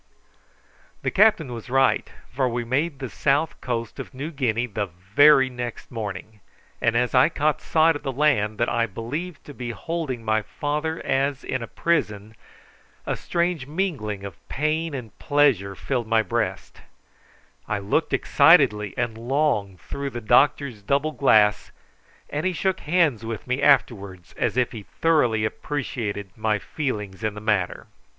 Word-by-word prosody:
The -, -, 0 dB
captain 195 Hz, -, +3 dB
was 115 Hz, +1 st, -8 dB
right, 135 Hz, +1 st, +2 dB, 0.2 s
for 130 Hz, -1 st, +1 dB
we 120 Hz, 0 st, -2 dB
made 140 Hz, +5 st, 0 dB
the 135 Hz, -1 st, -5 dB
south 145 Hz, +5 st, 0 dB
coast 115 Hz, -2 st, -4 dB
of -, -, -8 dB
New 145 Hz, +5 st, -5 dB
Guinea 125 Hz, -5 st, 0 dB
the 105 Hz, -3 st, -3 dB
very 130 Hz, -, +4 dB
next 120 Hz, -2 st, -6 dB
morning, 105 Hz, -1 st, -6 dB, 0.4 s
and 115 Hz, -1 st, +2 dB
as 125 Hz, 0 st, +1 dB
I 130 Hz, +4 st, +5 dB
caught 150 Hz, -2 st, 0 dB
sight 160 Hz, 0 st, +3 dB
of 145 Hz, -, -5 dB
the 135 Hz, -, -3 dB
land 125 Hz, -7 st, +1 dB
that 120 Hz, -, +1 dB
I 115 Hz, 0 st, +1 dB
believed 140 Hz, -, -6 dB
to 145 Hz, -, -10 dB
be 125 Hz, -3 st, -6 dB
holding 130 Hz, -2 st, -4 dB
my 110 Hz, 0 st, +2 dB
father 150 Hz, +7 st, -3 dB
as 135 Hz, 0 st, 0 dB
in 130 Hz, -, -3 dB
a 115 Hz, -, -5 dB
prison, 110 Hz, -12 st, -1 dB, 0.7 s
a -, -, -1 dB
strange 170 Hz, -5 st, -1 dB
mingling 145 Hz, -, -2 dB
of 100 Hz, -3 st, -9 dB
pain 155 Hz, +1 st, -1 dB
and 120 Hz, -5 st, -8 dB
pleasure 130 Hz, -10 st, +2 dB
filled 125 Hz, -1 st, -2 dB
my 110 Hz, 0 st, +3 dB
breast 95 Hz, -, -3 dB, 0.9 s
I 105 Hz, -, -1 dB
looked 100 Hz, +11 st, 0 dB
excitedly 120 Hz, -, +4 dB
and 120 Hz, -2 st, -1 dB
long 115 Hz, -5 st, 0 dB
through 140 Hz, +10 st, -5 dB
the 120 Hz, -, -6 dB
doctor's 125 Hz, 0 st, +2 dB
double 140 Hz, +8 st, 0 dB
glass, 110 Hz, -7 st, +3 dB, 0.6 s
and 150 Hz, +1 st, -3 dB
he 185 Hz, -, 0 dB
shook 190 Hz, +2 st, -1 dB
hands 150 Hz, -8 st, +1 dB
with 115 Hz, -2 st, -5 dB
me 125 Hz, +2 st, -1 dB
afterwards, 100 Hz, -10 st, +1 dB
as 115 Hz, +1 st, -1 dB
if 125 Hz, -1 st, +2 dB
he 115 Hz, -, -7 dB
thoroughly 120 Hz, -4 st, +1 dB
appreciated 110 Hz, -6 st, -4 dB
my 110 Hz, -1 st, 0 dB
feelings 105 Hz, -5 st, -4 dB
in 110 Hz, -1 st, -1 dB
the -, -, -6 dB
matter. 105 Hz, -4 st, -1 dB
125 Hz, 160 wpm, -24 LUFS, 110-150 Hz, 0.9 s, I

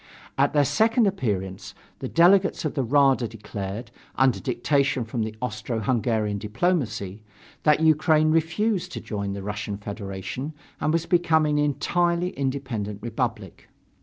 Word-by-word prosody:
At 140 Hz, +1 st, +2 dB
their 145 Hz, -1 st, +4 dB
second 225 Hz, -, +3 dB
appearance 100 Hz, -, -2 dB, 0.2 s
the 130 Hz, -, -4 dB
delegates 180 Hz, +4 st, +4 dB
of 155 Hz, -, -1 dB
the 140 Hz, -, 0 dB
Rada 135 Hz, -1 st, +3 dB
declared, 105 Hz, +1 st, -6 dB, 0.2 s
under 130 Hz, -2 st, +3 dB
dictation 135 Hz, 0 st, 0 dB
from 115 Hz, +1 st, -3 dB
the 110 Hz, 0 st, -3 dB
Austro 110 Hz, 0 st, -3 dB
Hungarian 110 Hz, -3 st, 0 dB
diplomacy, 110 Hz, -, -1 dB, 0.4 s
that 150 Hz, 0 st, +3 dB
Ukraine 155 Hz, 0 st, +4 dB
refused 180 Hz, +4 st, 0 dB
to -, -, -4 dB
join 100 Hz, -2 st, -4 dB
the 100 Hz, -1 st, -6 dB
Russian 105 Hz, 0 st, -4 dB
Federation 100 Hz, +7 st, -6 dB, 0.3 s
and 155 Hz, -, +1 dB
was 165 Hz, 0 st, 0 dB
becoming 160 Hz, -4 st, +2 dB
an 150 Hz, -, +3 dB
entirely 175 Hz, +4 st, 0 dB
independent 130 Hz, -7 st, -3 dB
republic. 115 Hz, -4 st, -4 dB
130 Hz, 135 wpm, -25 LUFS, 105-155 Hz, 0.4 s, their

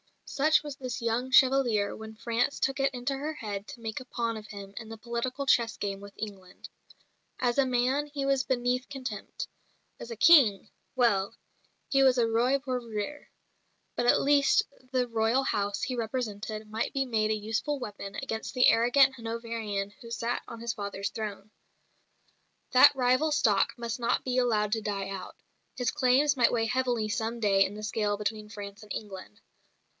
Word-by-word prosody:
Such 310 Hz, +2 st, +2 dB
was 290 Hz, -2 st, -7 dB
this 255 Hz, -3 st, -5 dB
"Young 235 Hz, +2 st, -1 dB
Chevalier" 255 Hz, -6 st, +4 dB
when 220 Hz, 0 st, -9 dB
France 235 Hz, +4 st, -1 dB
took 270 Hz, +1 st, 0 dB
it 270 Hz, 0 st, +2 dB
into 250 Hz, +2 st, -2 dB
her 295 Hz, +3 st, -4 dB
head 205 Hz, -6 st, -6 dB
to 235 Hz, -, -10 dB
make 220 Hz, +1 st, -4 dB
a 255 Hz, -, -10 dB
pawn 235 Hz, -2 st, -2 dB
of 215 Hz, -1 st, -8 dB
him 200 Hz, -1 st, -9 dB
in 220 Hz, -2 st, -7 dB
the 225 Hz, -, -8 dB
political 235 Hz, +4 st, -3 dB
chess 235 Hz, -4 st, +2 dB
game 195 Hz, -1 st, -3 dB
with 200 Hz, 0 st, -11 dB
England. 195 Hz, -4 st, -8 dB, 0.7 s
As 245 Hz, +1 st, +1 dB
a 275 Hz, -, +5 dB
man 255 Hz, +4 st, +1 dB
he 285 Hz, -1 st, -4 dB
was 275 Hz, -1 st, +2 dB
beneath 250 Hz, 0 st, -1 dB
contempt; 255 Hz, -7 st, -6 dB, 0.5 s
as -, -, -8 dB
a 230 Hz, -, -5 dB
"King" 225 Hz, -, +6 dB, 0.3 s
well, 230 Hz, -4 st, +2 dB, 0.5 s
he 275 Hz, -, +3 dB
was 260 Hz, -1 st, +5 dB
a 235 Hz, -, +4 dB
Roi 240 Hz, +4 st, +2 dB
pour 260 Hz, -2 st, -3 dB
rire; 235 Hz, +5 st, -6 dB, 0.7 s
but 240 Hz, -, 0 dB
at -, -, +5 dB
least 285 Hz, 0 st, +4 dB, 0.3 s
the 255 Hz, -2 st, +1 dB
Royal 230 Hz, +3 st, +1 dB
House 205 Hz, -5 st, -1 dB
he 255 Hz, -, -2 dB
represented 220 Hz, -2 st, -4 dB
might 220 Hz, +1 st, -2 dB
be 270 Hz, -1 st, 0 dB
made 220 Hz, -4 st, 0 dB
a 215 Hz, -, +2 dB
useful 220 Hz, +7 st, -2 dB
weapon 205 Hz, -5 st, -7 dB
against 225 Hz, -3 st, -4 dB
the 250 Hz, -, +6 dB
arrogant 260 Hz, +4 st, +5 dB
Hanoverian 225 Hz, -4 st, -4 dB
who 230 Hz, -, -10 dB
sat 235 Hz, +1 st, -2 dB
on 230 Hz, -1 st, -9 dB
his 235 Hz, -1 st, -2 dB
father's 200 Hz, -1 st, -4 dB
throne. 210 Hz, -2 st, -6 dB, 1.2 s
That 255 Hz, +3 st, +7 dB
rival 255 Hz, +4 st, +2 dB
stock 210 Hz, -9 st, +3 dB
must 235 Hz, 0 st, -4 dB
not 235 Hz, -, 0 dB
be 255 Hz, 0 st, 0 dB
allowed 215 Hz, -4 st, +1 dB
to 220 Hz, 0 st, 0 dB
die 200 Hz, -2 st, -3 dB
out; 195 Hz, -1 st, -7 dB, 0.4 s
his 245 Hz, -3 st, 0 dB
claims 270 Hz, +3 st, +3 dB
might 245 Hz, -2 st, +3 dB
weigh 225 Hz, -1 st, +1 dB
heavily 245 Hz, -3 st, 0 dB
some 225 Hz, +2 st, -2 dB
day 195 Hz, -3 st, +4 dB
in 200 Hz, -, -5 dB
the 215 Hz, -, -8 dB
scale 210 Hz, -1 st, -1 dB
between 210 Hz, 0 st, -3 dB
France 205 Hz, -1 st, -8 dB
and 210 Hz, -, -13 dB
England. 205 Hz, +1 st, -8 dB
230 Hz, 180 wpm, -29 LUFS, 210-255 Hz, 1.2 s, That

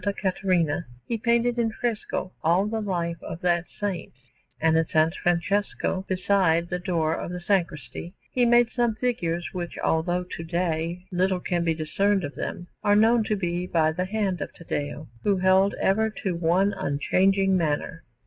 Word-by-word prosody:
Caterina, 180 Hz, -4 st, 0 dB, 0.2 s
he 235 Hz, -, -2 dB
painted 235 Hz, +1 st, +2 dB
in 225 Hz, -1 st, +1 dB
fresco 220 Hz, -5 st, -3 dB
all 175 Hz, +5 st, +3 dB
the 220 Hz, +1 st, -2 dB
life 170 Hz, -4 st, -2 dB
of 165 Hz, -, -6 dB
that 175 Hz, -1 st, +2 dB
Saint; 200 Hz, -5 st, -3 dB, 0.5 s
and 160 Hz, 0 st, +3 dB
in 165 Hz, -, +4 dB
S. 160 Hz, +1 st, +3 dB
Francesco, 190 Hz, +2 st, 0 dB
beside 185 Hz, -3 st, +2 dB
the 180 Hz, -, -2 dB
door 170 Hz, -4 st, 0 dB
of 170 Hz, -, -4 dB
the 180 Hz, 0 st, -4 dB
sacristy, 175 Hz, -3 st, -2 dB, 0.2 s
he 250 Hz, -, +2 dB
made 240 Hz, 0 st, +5 dB
some 240 Hz, -3 st, +1 dB
figures 175 Hz, -8 st, -1 dB
which, 175 Hz, -2 st, -5 dB
although 175 Hz, +3 st, 0 dB
to 175 Hz, -2 st, -7 dB
day 170 Hz, +1 st, -2 dB
little 185 Hz, +1 st, +1 dB
can 175 Hz, -1 st, -1 dB
be 165 Hz, -1 st, +1 dB
discerned 195 Hz, +5 st, +1 dB
of 145 Hz, -1 st, -4 dB
them, 175 Hz, -, -5 dB, 0.2 s
are 205 Hz, 0 st, +4 dB
known 225 Hz, +2 st, +5 dB
to 215 Hz, -, 0 dB
be 175 Hz, -2 st, -2 dB
by 160 Hz, -3 st, +2 dB
the 180 Hz, +3 st, -2 dB
hand 195 Hz, -3 st, -1 dB
of -, -, -4 dB
Taddeo, 145 Hz, -2 st, -4 dB, 0.2 s
who 200 Hz, -2 st, +2 dB
held 190 Hz, +2 st, +4 dB
ever 220 Hz, +3 st, +2 dB
to 195 Hz, -3 st, -3 dB
one 175 Hz, +4 st, +2 dB
unchanging 190 Hz, +7 st, +2 dB
manner. 165 Hz, -1 st, -1 dB
180 Hz, 170 wpm, -25 LUFS, 170-200 Hz, 0.5 s, made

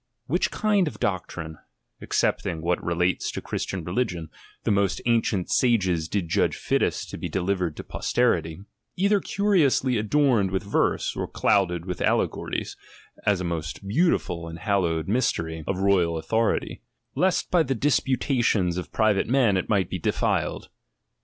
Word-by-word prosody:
Which 175 Hz, +7 st, +1 dB
kind 205 Hz, -4 st, +1 dB
of 150 Hz, -, -6 dB
doctrine, 85 Hz, -4 st, -3 dB, 0.4 s
excepting 80 Hz, -1 st, -1 dB
what 90 Hz, +1 st, 0 dB
relates 90 Hz, +1 st, 0 dB
to -, -, -3 dB
Christian 95 Hz, -3 st, -4 dB
religion, 85 Hz, -3 st, -2 dB, 0.3 s
the -, -, +1 dB
most 100 Hz, -1 st, +1 dB
ancient 115 Hz, -5 st, +1 dB
sages 95 Hz, -10 st, +2 dB
did 95 Hz, 0 st, -2 dB
judge 80 Hz, -, +1 dB
fittest -, -, -1 dB
to -, -, -7 dB
be -, -, -4 dB
delivered 90 Hz, -3 st, -1 dB
to -, -, -6 dB
posterity, 80 Hz, +2 st, 0 dB, 0.3 s
either 200 Hz, +2 st, +3 dB
curiously 155 Hz, -, +2 dB
adorned 115 Hz, -3 st, +2 dB
with 95 Hz, 0 st, -2 dB
verse, 100 Hz, -, 0 dB
or -, -, -3 dB
clouded 90 Hz, -4 st, +1 dB
with 90 Hz, -2 st, -5 dB
al -, -, +3 dB
legories, -, -, -3 dB, 0.5 s
as 100 Hz, -3 st, +3 dB
a -, -, -3 dB
most 85 Hz, +2 st, -4 dB
beautiful 100 Hz, -, +1 dB
and 80 Hz, 0 st, -7 dB
hallowed 85 Hz, -4 st, 0 dB
mystery 85 Hz, -8 st, 0 dB
X 80 Hz, -, -10 dB
THE -, -, +1 dB
PREFACE 95 Hz, -, -5 dB
^^^^^H -, -, +1 dB
of 100 Hz, -, +5 dB
royal 85 Hz, -3 st, +1 dB
authority; 110 Hz, +8 st, -1 dB, 0.3 s
lest 185 Hz, 0 st, +1 dB
by 175 Hz, -, +4 dB
the 135 Hz, -4 st, 0 dB
disputations 120 Hz, -8 st, +1 dB
of 90 Hz, -, -5 dB
pn 110 Hz, -1 st, +3 dB
vate 95 Hz, -, -1 dB
men 120 Hz, -5 st, +3 dB
it 95 Hz, -, -1 dB
might 100 Hz, -4 st, +2 dB
be 90 Hz, -, -2 dB
defiled. -, -, -1 dB
100 Hz, 165 wpm, -25 LUFS, 85-125 Hz, 0.5 s, of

